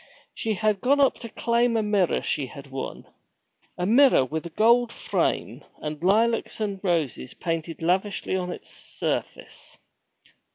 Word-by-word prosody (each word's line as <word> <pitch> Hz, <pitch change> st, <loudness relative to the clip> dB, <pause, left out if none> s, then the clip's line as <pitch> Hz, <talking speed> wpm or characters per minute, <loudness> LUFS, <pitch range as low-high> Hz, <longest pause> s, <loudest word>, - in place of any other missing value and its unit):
She 220 Hz, -1 st, -2 dB
had 215 Hz, -1 st, 0 dB
gone 280 Hz, +3 st, +3 dB
up 275 Hz, -2 st, +5 dB
to 230 Hz, -, -7 dB
claim 235 Hz, +1 st, +1 dB
a 220 Hz, -, +1 dB
mirror 205 Hz, -4 st, +1 dB
she 140 Hz, -3 st, -1 dB
had 140 Hz, +2 st, -12 dB
won 135 Hz, 0 st, -6 dB, 0.7 s
a 180 Hz, -, -1 dB
mirror 240 Hz, -, +5 dB
with 160 Hz, +5 st, -4 dB
a -, -, -9 dB
gold 235 Hz, +6 st, +3 dB
frame, -, -, -2 dB, 0.2 s
and 150 Hz, 0 st, -5 dB
lilacs 225 Hz, +6 st, +2 dB
and 200 Hz, -3 st, -2 dB
roses 160 Hz, -8 st, -1 dB
painted 165 Hz, -1 st, -4 dB
lavishly 190 Hz, +3 st, 0 dB
on 180 Hz, -1 st, -2 dB
its -, -, -9 dB
surface. -, -, -5 dB
195 Hz, 150 wpm, -25 LUFS, 165-230 Hz, 0.7 s, up